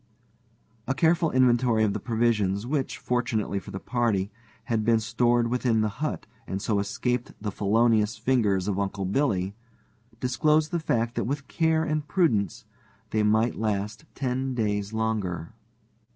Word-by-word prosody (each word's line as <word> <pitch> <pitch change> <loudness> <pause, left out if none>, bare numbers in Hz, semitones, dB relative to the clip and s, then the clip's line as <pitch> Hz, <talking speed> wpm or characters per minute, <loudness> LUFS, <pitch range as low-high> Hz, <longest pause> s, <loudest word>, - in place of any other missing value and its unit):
A 135 - 0
careful 165 +1 +3
inventory 120 -3 +3
of 105 -2 +2
the - - -2
provisions, 110 -4 +1
which, 135 +1 -2
fortunately 115 -5 -1
for - - -12
the 95 - -5
party, 110 -6 0 0.3
had 115 -3 -1
been 115 +1 +3
stored 120 +2 +2
within 120 -3 +2
the 110 - +1
hut 155 - -2 0.2
and 95 - -3
so 105 0 0
escaped 120 +4 -2
the 105 0 -3
felonious 110 +1 +2
fingers 110 -5 +1
of 100 -1 0
Uncle 100 0 -2
Billy, 100 -4 0 0.7
disclosed 150 +5 +2
the 170 - 0
fact 115 -6 0
that - - -2
with 140 +3 -3
care 160 -1 +1
and 155 -2 -2
prudence 115 - +1 0.5
they 110 - +2
might 110 +3 +3
last 105 0 -2
ten 130 0 -2
days 105 -3 -1
longer. 105 -7 -2
115 Hz, 150 wpm, -26 LUFS, 105-130 Hz, 0.7 s, careful